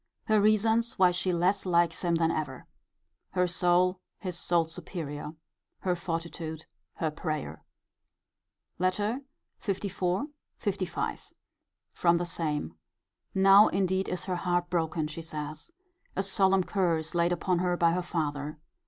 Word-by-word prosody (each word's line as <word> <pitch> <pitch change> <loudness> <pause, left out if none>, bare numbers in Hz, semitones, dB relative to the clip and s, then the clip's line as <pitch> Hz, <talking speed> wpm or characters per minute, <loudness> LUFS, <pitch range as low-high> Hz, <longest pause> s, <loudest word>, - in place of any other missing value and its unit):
Her 215 -1 +3
reasons 220 +2 +3
why 185 -1 +6
she 180 +1 0
less 180 +3 +2
likes 175 -2 +2
him 170 -1 +2
than 165 0 +2
ever. 140 -5 -4 0.7
Her 180 -1 +3
soul 180 +1 +2 0.2
his 180 -2 -4
soul's 170 -2 +1
superior. 150 -3 -6 0.5
Her 180 -2 +1
fortitude. 165 -2 -4 0.3
Her 160 -2 -1
prayer. 155 -1 -4 1.2
LETTER 205 +7 0 0.5
LIV. 195 -2 +1 0.8
LV. - - -3 0.6
From 170 -1 +3
the 175 - -1
same. 150 - -2 0.6
Now 195 +2 +8
indeed 190 0 0
is 180 - -3
her 185 -2 -1
heart 175 0 0
broken, 160 -2 0
she 155 +2 -6
says. 155 - -6 0.5
A 195 - 0
solemn 190 -1 +3
curse 170 -5 0
laid 170 0 +2
upon 180 0 +1
her 180 0 +1
by 170 -1 +4
her 180 +2 0
father. 150 -4 -3
175 Hz, 130 wpm, -29 LUFS, 165-185 Hz, 1.2 s, Now